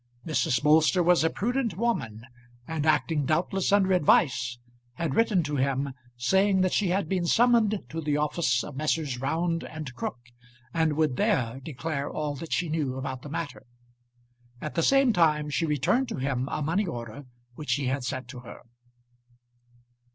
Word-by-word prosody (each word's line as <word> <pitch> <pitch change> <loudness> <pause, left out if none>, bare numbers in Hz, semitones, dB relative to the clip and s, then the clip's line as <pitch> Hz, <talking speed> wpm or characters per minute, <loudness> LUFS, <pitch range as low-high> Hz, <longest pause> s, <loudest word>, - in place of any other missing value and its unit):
Mrs. 130 -6 0
Bolster 155 +4 +4
was 175 -1 +4
a 165 - +3
prudent 235 0 -1
woman, 115 - -2 0.4
and, 160 -1 -2
acting 155 -1 +2
doubtless 180 +5 0
under 195 -2 +4
advice, 130 -7 +3 0.4
had 155 +1 -2
written 210 -4 +2
to 145 -1 -2
him, 135 +1 0 0.2
saying 190 +10 +3
that 185 -1 +1
she 205 - +2
had 190 +3 0
been 180 -3 -1
summoned 225 -2 +3
to 165 +3 -4
the 150 -1 0
office 150 -4 +1
of 145 - -8
Messrs. 145 -3 -1
Round 165 +4 -1
and 155 -5 -7
Crook, 130 - -4 0.6
and 160 -2 +2
would 150 -4 0
there 135 - +1
declare 140 +1 -4
all 150 -1 -3
that 165 +3 -8
she 180 - 0
knew 150 -5 -1
about 130 -1 -5
the 145 - -9
matter. 150 0 -5 1.0
At 155 - -5
the 165 - +1
same 270 +4 +4
time 150 -5 +2
she 160 +4 0
returned 150 - +1
to - - -3
him 130 0 -2
a 150 - -2
money 180 +7 0
order 120 -1 -7 0.3
which 135 -1 -2
he 140 -1 -2
had 130 +1 -1
sent 130 0 -4
to 125 -1 -8
her. 120 - -11
155 Hz, 170 wpm, -27 LUFS, 135-180 Hz, 1.0 s, Bolster